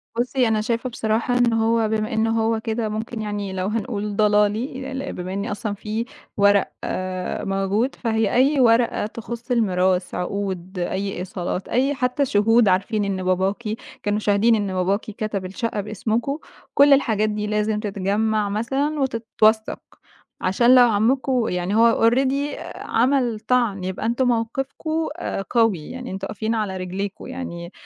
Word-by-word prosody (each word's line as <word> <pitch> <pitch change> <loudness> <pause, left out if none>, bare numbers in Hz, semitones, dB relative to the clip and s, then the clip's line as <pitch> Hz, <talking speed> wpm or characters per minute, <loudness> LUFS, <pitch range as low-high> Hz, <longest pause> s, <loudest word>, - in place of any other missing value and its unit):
بُصي، 245 +1 +1
أنا 220 -1 +1
شايفة 235 +3 -1
بصراحة 230 +1 0
إنه 230 -2 +3
هو 225 -1 +2
بمَا 215 0 -1
إنه 220 0 +1
هو 225 0 +1
كده 220 0 -2
ممكن 220 +1 -4
يعني 205 -2 -4
لو 185 0 -2
هنقول 210 -1 -3
ضلالي، 215 +6 +1 0.2
بمَا 180 +1 -5
إن 200 +1 -2
أصلًا 210 0 -3
في 215 +3 -4 0.3
ورق 200 0 +4
آآ، 185 -1 -3
موجود، 195 +6 0
فهي 220 -3 0
أي 275 +3 +3
ورقة 235 -3 +3
تخص 235 +3 -7
الميراث، 185 -5 +1
عقود، 185 0 -3
أي 195 +3 -2
إيصالات، 180 0 -4
أي 270 +3 +1
حتى 255 +2 0
شهود 225 0 +4
عارفين 200 +3 +1
إن 190 -2 -2
باباكِ 190 +4 0 0.4
كانوا 205 0 0
شاهدين 215 +2 +3
إن 205 -3 -2
باباكِ 190 +3 +1
كتب 215 -2 -4
الشقة 205 +2 -3
باسمكم 220 +6 -2 0.4
كل 280 0 +7
الحاجات 215 -6 +2
دي 210 0 -2
لازم 210 0 0
تتجمّع 205 +1 0
مثلًا 270 +8 -1
وتتوثق، 225 -4 +1 0.6
عشان 235 +7 +4
لو 245 -1 +8
عمّكم 245 +3 +1
يعني 180 +3 -1
هو 230 0 +5
already 270 +4 0 0.2
عمل 245 -2 +1
طَعْن، 220 -4 +1
يبقى 185 +4 -4
أنتم 240 +3 +1
موقفكم 270 +7 -1 0.4
قوي 225 -10 +1
يعني 255 0 -7
أنتم 195 +1 -4
واقفين 220 +2 -2
على 205 -4 -2
رجليكم 185 +2 -5
يعني 185 -10 -6
220 Hz, 145 wpm, -22 LUFS, 200-240 Hz, 0.6 s, لو